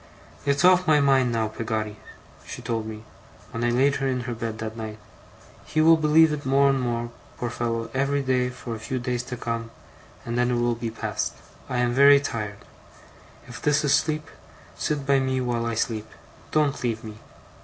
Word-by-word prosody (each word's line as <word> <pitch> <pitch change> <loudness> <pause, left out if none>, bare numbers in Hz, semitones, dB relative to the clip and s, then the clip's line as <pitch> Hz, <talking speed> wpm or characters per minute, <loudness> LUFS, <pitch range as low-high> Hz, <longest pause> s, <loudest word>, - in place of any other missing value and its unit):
'"It's 140 +4 +3
off 185 0 +5
my 155 -1 +5
mind 135 -3 +3
now, 115 -1 0
Peggotty," 110 -1 -3 0.5
she - - -8
told 115 -2 -2
me, 110 0 -7 0.5
when 115 -1 -3
I 120 - +2
laid 135 +4 +3
her 135 - -1
in 130 -1 -1
her 120 0 -4
bed 115 -1 -4
that 110 0 -5
night. 110 -1 -6 0.7
"He 155 - -2
will 165 +1 +7
believe 155 0 +4
it 145 -1 -4
more 140 +1 +4
and 135 - 0
more, 120 -1 -2 0.3
poor 120 -1 -3
fellow, 115 -1 -2
every 140 +1 +1
day 125 -1 +1
for 125 -1 -7
a 110 - -6
few 130 +4 -3
days 125 -1 -2
to 125 0 -6
come; 115 -1 -3 0.6
and 120 +1 -2
then 125 0 +2
it 125 - +1
will 120 0 +1
be 115 0 -4
past. 115 - -3 0.3
I - - -1
am 120 0 +1
very 140 +2 +7
tired. 105 -7 -4 0.9
If 120 -3 -9
this 150 0 +2
is 140 - +3
sleep, 155 +1 +1 0.5
sit 145 -2 -2
by 140 0 +4
me 130 0 0
while 120 -2 -1
I 115 - -2
sleep: 110 -1 -2 0.4
don't 150 -2 +1
leave 115 -1 -1
me. 110 -1 -9
125 Hz, 195 wpm, -25 LUFS, 115-140 Hz, 0.9 s, will